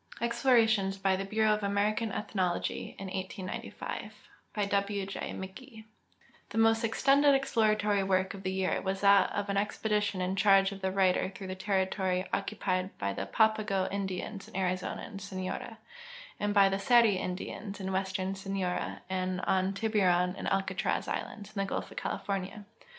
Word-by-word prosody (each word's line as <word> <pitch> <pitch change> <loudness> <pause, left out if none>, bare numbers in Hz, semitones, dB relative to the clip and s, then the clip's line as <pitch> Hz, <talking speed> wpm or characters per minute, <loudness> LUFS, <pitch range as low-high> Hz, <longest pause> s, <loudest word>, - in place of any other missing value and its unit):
EXPLORATIONS 230 -5 +3
BY 195 0 +2
THE 195 +1 -3
BUREAU 215 +1 +2
OF 210 - -1
AMERICAN 205 +2 +1
ETHNOLOGY 185 -4 -2
IN 195 - -6
1895 190 0 -5 0.4
By 205 -2 -1
W 200 0 0
J 195 - -6
McGee 220 +5 -9 0.7
The - - -6
most 225 0 +4
extended 275 +5 +4
exploratory 215 -6 +2
work 190 -1 +1
of 195 - -8
the 190 -1 -2
year 190 0 0
was 195 0 -2
that 200 0 +5
of 205 0 -2
an 200 0 -1
expedition 210 -1 0
in 185 +1 -1
charge 195 0 +5
of 195 -1 -8
the 190 0 0
writer 190 -1 +2
through 195 0 -9
the 185 - -4
territory 190 -1 0
occu 200 +1 -2
pied 185 0 -1
by 100 0 -2
the - - -4
Papago 215 -3 +2
Indians 195 +1 -4
in - - -15
Arizona 185 -1 -1
and 200 -3 -8
Sonora, 190 -1 -5 0.6
and 205 0 0
by 200 -1 +6
tlie 195 0 -1
Seri 230 -3 +5
Indians 195 +3 -5
in 190 0 -3
western 190 0 -1
Sonora 195 -2 -3
and 185 0 -1
on 190 0 +1
Tibnron 195 -4 +2
and - - -5
Alcatraz 195 0 0
islands, 205 0 -5
in - - -2
the 195 - -2
gulf - - -3
of - - -13
California. 200 +1 -3
195 Hz, 165 wpm, -30 LUFS, 190-210 Hz, 0.7 s, by